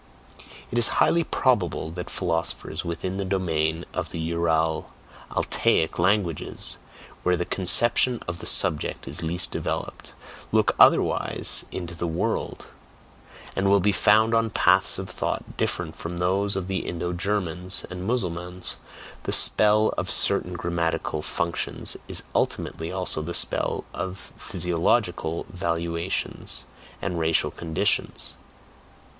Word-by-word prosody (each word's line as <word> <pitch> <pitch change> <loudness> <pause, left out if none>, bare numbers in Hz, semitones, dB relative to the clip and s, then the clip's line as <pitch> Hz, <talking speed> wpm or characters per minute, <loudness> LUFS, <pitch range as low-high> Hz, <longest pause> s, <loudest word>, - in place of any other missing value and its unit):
It 120 - +1
is 120 - +8
highly 170 0 +4
probable 100 - 0
that 90 +1 -6
philosophers 85 -1 -3
within 90 +2 -4
the 100 - -2
domain 85 -4 -1
of 85 -3 -3
the - - -7
Ural 80 -1 0 0.4
Altaic 80 - +1
languages 90 -3 0 0.4
(where 90 0 +1
the 90 - -2
conception 120 +6 +3
of 85 0 -4
the - - -2
subject 75 -2 +2
is - - -1
least 85 +3 +3
developed) - - -5 0.4
look - - +3
otherwise - - +3
"into 90 -2 -5
the 85 +1 -3
world," 95 +8 -2 0.9
and 95 0 +1
will 100 0 +5
be 105 +2 +2
found 110 +3 +4
on 115 0 +2
paths - - +3
of - - -5
thought - - -4
different 80 -2 -2
from 85 +1 -6
those 95 +3 +1
of 95 -2 -3
the 95 -1 -1
Indo 85 0 -4
Germans 90 -1 -2
and 90 0 -6
Mussulmans, 90 -5 -2 0.4
the - - -3
spell 105 0 +6
of - - -3
certain 90 - +4
grammatical 85 -3 -2
functions 85 +2 -2
is - - +4
ultimately 80 0 -2
also 90 -4 -2
the 85 +2 -4
spell - - +1
of 95 +1 -6
PHYSIOLOGICAL 85 -1 0
valuations 85 0 -3 0.4
and 85 - -2
racial 80 0 +2
conditions. 80 -2 -1
90 Hz, 125 wpm, -25 LUFS, 85-95 Hz, 0.9 s, is